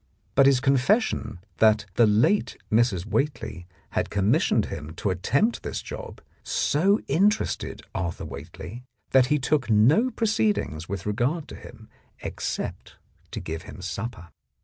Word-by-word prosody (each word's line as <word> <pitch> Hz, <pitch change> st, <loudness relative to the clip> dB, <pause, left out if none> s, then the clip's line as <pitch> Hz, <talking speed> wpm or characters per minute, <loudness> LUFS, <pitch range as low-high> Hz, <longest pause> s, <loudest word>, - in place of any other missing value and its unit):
But 135 Hz, 0 st, +6 dB
his 135 Hz, -2 st, +5 dB
confession 135 Hz, -, +1 dB, 0.2 s
that 110 Hz, -2 st, +4 dB
the 115 Hz, +4 st, +5 dB
late 115 Hz, -, +2 dB
Mrs. 110 Hz, -5 st, +2 dB
Whately 120 Hz, -, -2 dB, 0.2 s
had -, -, -1 dB
commissioned 100 Hz, 0 st, +2 dB
him 75 Hz, +2 st, -7 dB
to 100 Hz, +1 st, -1 dB
attempt 140 Hz, -, +1 dB
this -, -, -4 dB
job -, -, -8 dB, 0.2 s
so 195 Hz, +8 st, +2 dB
interested 210 Hz, +5 st, +1 dB
Arthur 85 Hz, -2 st, -3 dB
Whately 120 Hz, +7 st, -8 dB, 0.3 s
that 130 Hz, -1 st, +5 dB
he 150 Hz, -, +2 dB
took 130 Hz, -1 st, 0 dB
no 130 Hz, -, +5 dB
pro 230 Hz, -1 st, -2 dB
ceedings 205 Hz, -, 0 dB
with 100 Hz, -1 st, -4 dB
regard 125 Hz, +10 st, -1 dB
to -, -, -8 dB
him, -, -, -13 dB, 0.4 s
except -, -, -4 dB, 0.3 s
to -, -, -5 dB
give 80 Hz, +1 st, -5 dB
him -, -, -11 dB
supper. 90 Hz, +2 st, -5 dB
120 Hz, 140 wpm, -25 LUFS, 95-150 Hz, 0.4 s, But